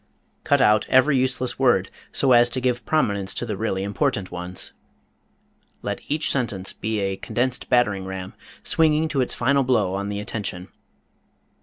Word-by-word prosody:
Cut - - +3
out 105 0 +4
every 130 +3 +4
useless 130 -1 0
word, 120 -8 +3 0.2
so 135 - +2
as 120 -1 +6
to 130 - -2
give 125 -1 -1
prominence 100 -11 0
to - - -2
the 110 -3 -3
really 95 -2 -2
important 100 -2 -1
ones. 90 +1 -5 1.1
Let - - -3
each 155 +2 0
sentence 105 -8 -2
be 110 0 -3
a 95 0 -1
condensed 125 +4 -2
battering 105 -6 +2
ram, 95 0 -6 0.3
swinging 160 0 +2
to 140 -3 0
its 125 - -1
final 140 +3 +2
blow 115 -8 +1
on 100 +1 -3
the 100 0 -3
attention. 100 -4 -4
115 Hz, 160 wpm, -23 LUFS, 95-130 Hz, 1.1 s, as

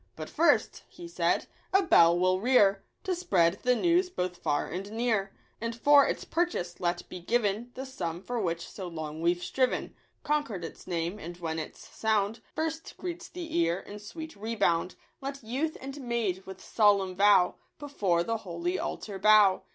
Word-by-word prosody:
"But 155 -1 -7
first," 335 +2 +2
he 345 - -10
said, 340 - 0 0.3
"a 390 +1 +4
bell 170 - +6
we'll 185 +1 +2
rear 200 -4 +4 0.2
To 380 -2 -1
spread 190 - +2
the 250 0 +3
news 350 +6 +2
both 180 - -3
far 145 -3 0
and 195 +4 -6
near; 220 -4 0 0.3
And 230 0 -3
for 285 +3 +6
its - - -3
purchase 330 - -1
let 175 0 -1
be 180 - -8
given 220 +3 0
The 265 - -5
sum 175 -11 -4
for 245 +2 -3
which 170 -2 -2
so 190 -3 -7
long 160 -2 -6
we've 175 +1 +1
striven, 255 -1 0 0.2
— - - -44
Concord 280 - -1
its - - -10
name; 175 +3 -2
and 175 0 -8
when 165 -2 -3
its 155 - -8
sound 220 0 0 0.2
First 320 0 -3
greets 345 -1 -6
the 350 -2 -7
ear 170 +2 +2
in 205 +1 -10
sweet 315 +10 -8
rebound, 200 -5 0 0.3
Let 275 -1 -6
youth 270 +8 -2
and 275 +2 -7
maid 220 -7 -2
with 190 -1 -9
solemn 200 -4 +3
vow 195 -2 +5 0.2
Before 200 - 0
the 225 +4 -1
holy 175 -2 -3
altar 200 -3 -5
bow." 210 -1 +5
205 Hz, 175 wpm, -29 LUFS, 180-265 Hz, 0.3 s, bell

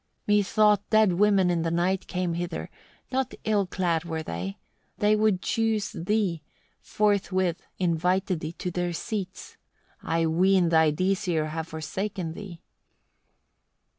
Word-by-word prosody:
26. 205 -1 +1
"Methought 210 -1 +4
dead 215 -3 +4
women 195 -1 +3
in 170 -1 0
the 165 - 0
night 180 +3 0
came 180 -2 -1
hither; 170 -1 -4 0.4
not 260 -1 -1
ill 205 -3 +1
clad 175 -3 0
were 160 -2 -4
they: 90 - -5 0.4
they 210 +1 +3
would 210 -4 +2
choose 225 -2 0
thee, 185 -2 -1 0.4
forthwith 190 -4 0 0.2
invited 180 +1 +1
thee 155 +1 -5
to 180 +1 -4
their 175 0 -2
seats. 195 +1 -5 0.4
I 165 0 0
ween 180 +2 +3
thy 160 -1 +5
Disir 175 -1 0
have 160 +1 -4
forsaken 165 +2 -4
thee." 180 -3 -9
180 Hz, 135 wpm, -26 LUFS, 165-205 Hz, 0.4 s, thy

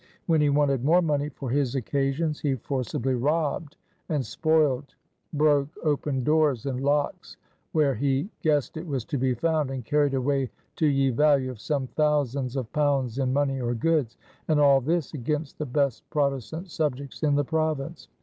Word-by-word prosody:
When 160 -3 +3
he 145 - +3
wanted 140 -3 +2
more 170 +5 +4
money 145 -2 0
for 135 -3 -6
his 135 -1 0
occasions, 140 +4 -1
he 140 -3 0
forcebly 130 +1 -2
robbed 150 +3 -1 0.3
and 145 -5 0
spoiled, 145 +2 +1 0.4
broke 145 -2 +3
open 145 -3 0
doors 150 -4 +2
and 130 -2 -2
locx 145 +2 -1 0.3
were 150 -4 +2
he 135 - 0
guissed 150 -2 +1
it 165 +2 -6
was 135 -6 -2
to 145 -5 -3
be 130 -1 +1
found, 155 +2 0
and 130 -3 -5
carried 145 +1 +2
away 135 0 0 0.3
to 155 - +3
ye 135 -2 +2
vallue 135 0 +3
of 115 -4 -11
some 145 -4 -1
thousands 140 -3 0
of 130 -4 -4
pounds 140 -4 +1
in 130 -1 +1
money 135 -1 0
or 120 0 -1
goods; 145 -1 0 0.3
and 155 -2 +3
all 140 -2 +5
this 160 +3 -1
against 150 +2 -3
the 150 - -3
best 140 -1 -1
Protestant 145 - -2
subjects 140 -4 -3
in 150 -2 +2
the 145 0 +1
Province. 155 0 -2
140 Hz, 170 wpm, -26 LUFS, 130-150 Hz, 0.4 s, all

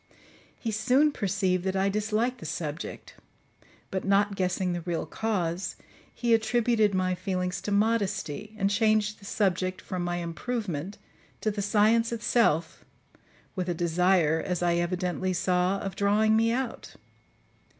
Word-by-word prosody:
He 225 - -3
soon 255 +7 +3
perceived 190 -6 0
that 190 0 -1
I 190 +1 +2
disliked 215 +5 0
the - - -7
subject; 155 -1 -5 0.8
but 190 - -2
not 200 +1 +2
guessing 185 -1 0
the 175 - -3
real 170 -1 -2
cause, 185 -4 -2 0.4
he 235 -1 0
attributed 225 -2 +2
my 185 0 +1
feelings 180 -1 -2
to 205 - -4
modesty, 210 -2 0
and 195 -1 +1
changed 215 0 +2
the 200 - -14
subject 185 -2 0
from 180 -1 -4
my 175 0 -1
improvement, 175 0 -4 0.4
to 215 - +1
the 205 0 -3
science 220 +3 +3
itself, 225 -8 +1 0.7
with 185 -2 -2
a 175 - 0
desire, 170 -1 +2
as 180 -2 -2
I 170 -1 +2
evidently 180 +1 -1
saw, 180 +1 +1
of 195 -2 -5
drawing 210 +2 +3
me 225 +1 +3
out. 255 0 -4
195 Hz, 140 wpm, -27 LUFS, 180-220 Hz, 0.8 s, soon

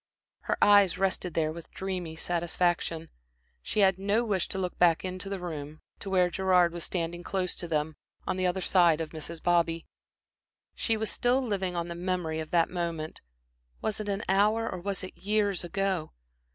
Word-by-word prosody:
Her - - 0
eyes 205 -3 +6
rested 185 -3 -1
there 155 -1 +1
with 165 0 -9
dreamy 180 -4 -4
satisfaction. 170 -1 0 0.5
She 210 - 0
had 190 -1 +4
no 205 +4 +2
wish 195 -5 0
to - - -4
look 180 -2 -3
back 175 0 +4
into 185 +1 -4
the 195 -1 -3
room, 155 -3 -6 0.2
to 195 - -6
where 180 -2 +3
Gerard 180 -2 +3
was 170 -1 -4
standing 175 -1 -3
close 185 0 -2
to 175 - -6
them, 155 -1 -1 0.3
on - - -1
the 185 0 +1
other 185 +1 -1
side 175 -4 +4
of 160 -1 -4
Mrs. 160 +1 -7
Bobby. 170 -1 +2 0.9
She 225 -2 0
was 220 0 -1
still 245 +2 +2
living 190 -5 -1
on 170 0 -2
the 170 - -4
memory 175 -2 -2
of 155 -1 -5
that 170 -1 +2
moment 170 -3 -3 0.6
was 215 -1 -2
it 210 -1 -3
an 200 +2 -1
hour 210 +4 +3
or 185 - -4
was 195 +1 -3
it 185 - -7
years 205 -2 +1
ago? 185 -1 -1
180 Hz, 185 wpm, -29 LUFS, 170-195 Hz, 0.9 s, eyes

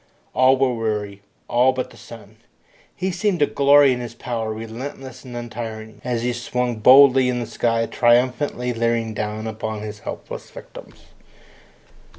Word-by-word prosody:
All 130 +1 +4
were 130 -1 +2
weary, 105 -3 -3 0.3
all 125 +2 +3
but 130 0 -4
the - - -15
sun. 110 -2 -13 0.6
He 190 +1 -2
seemed 190 +1 0
to 150 - +3
glory 140 -1 +5
in 125 - -4
his 120 -1 -7
power, 115 -3 -4
relentless 125 +4 -8
and 125 -2 -10
untiring, 110 -2 -7
as 120 -2 -2
he 125 0 0
swung 120 0 -2
boldly 130 +2 +7
in 125 -1 -1
the 120 - -3
sky, 115 0 0
triumphantly 125 +1 +1
leering 115 -1 -1
down 105 +1 -4
upon 110 -1 -5
his 105 0 -7
helpless - - -8
victims. - - -13
120 Hz, 155 wpm, -21 LUFS, 110-130 Hz, 0.6 s, boldly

